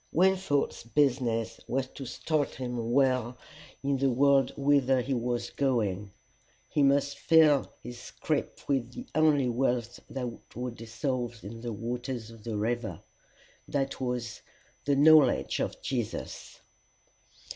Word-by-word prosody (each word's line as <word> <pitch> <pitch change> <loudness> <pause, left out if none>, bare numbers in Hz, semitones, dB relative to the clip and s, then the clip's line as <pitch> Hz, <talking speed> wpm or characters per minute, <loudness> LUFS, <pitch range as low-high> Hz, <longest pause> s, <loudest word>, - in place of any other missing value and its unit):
Wingfold's 185 -5 +2
business 120 -2 0
was 130 +1 0
to 135 -1 -8
start 150 +4 -1
him 120 -2 -3
well 130 -2 +2 0.5
in 140 0 +1
the 135 0 +3
world 135 +1 +4
whither 140 -2 +3
he 130 +2 -1
was 120 -1 -2
going. 105 -8 0 0.6
He 150 - 0
must 140 0 +2
fill 155 -4 +5
his 120 0 -8
scrip 145 +4 -3
with 125 -4 0
the - - -7
only 150 -4 +4
wealth 120 -1 0
that 130 -2 -3 0.3
would 125 +1 -3
not 115 - -14
dissolve 120 +1 -3
in 115 +3 -8
the 120 0 -4
waters 120 +1 -4
of 115 -2 -14
the 110 -2 -3
river 110 -4 -2 0.6
that 135 -1 -2
was, 125 -3 -3 0.4
the 140 - +3
knowledge 155 +2 +5
of - - -2
Jesus. - - -4
125 Hz, 135 wpm, -29 LUFS, 120-140 Hz, 0.6 s, fill